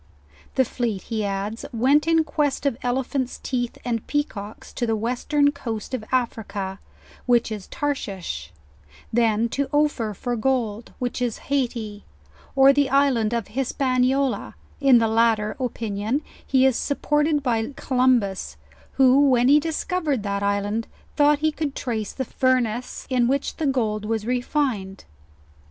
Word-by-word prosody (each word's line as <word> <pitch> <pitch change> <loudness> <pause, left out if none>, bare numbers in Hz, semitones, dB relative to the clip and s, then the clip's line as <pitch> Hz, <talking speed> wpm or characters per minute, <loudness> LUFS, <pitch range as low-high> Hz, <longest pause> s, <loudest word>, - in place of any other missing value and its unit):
The 260 - +4
fleet, 230 -5 -2
he 220 -2 -2
adds, 200 +3 -3
went 270 +7 +3
in 325 -1 +4
quest 290 -2 -1
of 275 -4 +2
ele 250 +2 0
phant's 260 -1 -3
teeth 245 -2 -3
and 230 -3 -2
peacocks 215 -8 -4
to 240 - -2
the 225 - +1
western 255 +6 +1
coast 235 -5 -5
of 250 -4 -2
Africa, 210 -6 -2 0.5
which 240 -2 +3
is 210 -3 -5
Tarehiah: 195 - -3 0.6
then 225 -1 +3
to 280 +3 -2
Ophir 290 -8 +1
for 245 +5 -2
gold, 230 -2 -1
which 250 0 -3
is 240 -3 -1
Haiti, 235 -6 -1 0.5
or 270 0 +7
the 280 -1 +2
island 265 -5 +3
of 235 -3 -2
Hispaniola; 260 +1 0 0.2
in 275 -3 +6
the 225 -1 +3
latter 220 -1 +2
opinion 230 +1 -2 0.2
he 265 -1 +3
is 265 -2 +4
suppor 295 +1 0
ted 295 -2 +1
by 230 -1 0
Columbus, 240 - +1 0.4
who, 270 +1 +5
when 250 0 +4
he 295 +2 +7
discovered 315 - -1
that 200 -1 -2
island, 205 +2 -1 0.3
thought 295 0 +5
he 310 - +3
could 300 -2 -3
trace 220 -5 -3
the 265 - -4
furnaces 250 -2 0
in 245 -2 +3
which 275 +2 -1
the 310 - 0
gold 220 -6 0
was 220 -1 -2
refined. 245 -6 -1
245 Hz, 145 wpm, -23 LUFS, 220-275 Hz, 0.6 s, or